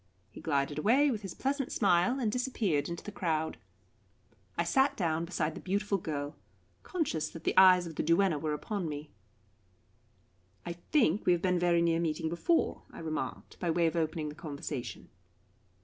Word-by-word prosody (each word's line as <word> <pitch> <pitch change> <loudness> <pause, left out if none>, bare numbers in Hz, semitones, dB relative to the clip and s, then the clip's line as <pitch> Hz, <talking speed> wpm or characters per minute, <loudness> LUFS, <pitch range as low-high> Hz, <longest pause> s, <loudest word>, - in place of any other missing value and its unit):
He - - -11
glided 145 -1 0
away 265 - +4
with 215 -4 -3
his 195 -4 -7
pleasant 275 0 -1
smile, 195 +5 +3
and 225 -5 0
disappeared 210 - 0
in 170 - -2
the 210 - -8
crowd. 160 -5 -1 1.0
I - - +2
sat 270 +1 +2
down 165 -4 0
beside 165 -2 -1
the - - -8
beautiful 200 +1 0
girl, 145 -2 -4 0.5
conscious 310 - -2
that 165 - -10
the - - 0
eyes 185 -1 +7
of 160 -2 -8
the - - +1
duenna 170 -1 +3
were 155 0 -1
upon 185 +1 -3
me. 150 0 -6 1.5
"I 170 - -3
think 200 - +1
we 180 - +6
have 175 - 0
been 180 -1 +2
very 170 -1 +3
near 165 -1 +2
meeting 160 -1 -1
before," 250 - +1
I - - -12
remarked, 160 -1 -5
by 175 - -1
way 170 +1 +2
of 165 - +1
opening 160 -2 -1
the - - -7
conversation. 145 -4 -6
170 Hz, 175 wpm, -31 LUFS, 155-205 Hz, 1.5 s, eyes